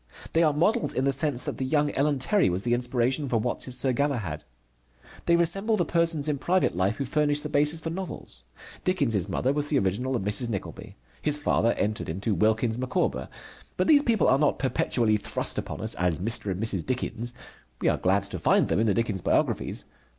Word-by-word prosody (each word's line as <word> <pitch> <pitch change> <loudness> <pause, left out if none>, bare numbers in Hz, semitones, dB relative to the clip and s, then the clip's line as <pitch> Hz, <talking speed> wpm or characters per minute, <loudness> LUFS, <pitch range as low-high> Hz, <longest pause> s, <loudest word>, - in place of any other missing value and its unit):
They 165 - +3
are 155 -2 +4
models 205 +11 +1
in 130 - 0
the 140 - +2
sense 140 -2 +1
that - - -4
the - - -1
young 145 +2 +1
Ellen 145 +1 +1
Terry 190 - +2
was 90 +2 -2
the 120 - +1
inspiration 125 +3 0
for 120 - +1
Watts' 125 +2 -2
Sir 130 -2 +3
Galahad. 120 - -2 0.8
They 170 - +5
resemble 195 +6 +2
the 175 - +1
persons 165 -3 +1
in 145 -2 -1
private 180 - +1
life 95 +4 +1
who 140 - -3
furnish 145 +1 +2
the 150 - -4
basis 150 +2 +2
for 165 - -4
novels. 165 - -7 0.4
Dickens' 115 - 0
mother 130 +9 0
was 145 0 -1
the 145 - +2
original 125 +6 -1
of 115 - -2
Mrs. 105 +4 +1
Nickleby. 100 -4 -6 0.3
His 150 -1 0
father 120 -5 +1
entered 105 -3 -2
into 95 +7 -2
Wilkins 110 +3 +1
Micawber. 125 - -1 0.5
But 185 - +1
these 290 +4 +6
people 230 - +2
are 135 +2 +4
not 150 -1 +2
perpetually 120 -4 +1
thrust - - -1
upon - - -6
us - - 0
as 90 -3 0
Mr. 105 +1 -1
and 95 -1 -3
Mrs. 100 -6 0
Dickens. 120 -2 -3 0.4
We - - -1
are - - +2
glad 95 +1 +1
to 100 - -6
find - - +2
them - - +1
in 110 - +2
the 100 - +2
Dickens 110 -5 -1
biographies. - - 0
130 Hz, 205 wpm, -26 LUFS, 110-150 Hz, 0.8 s, these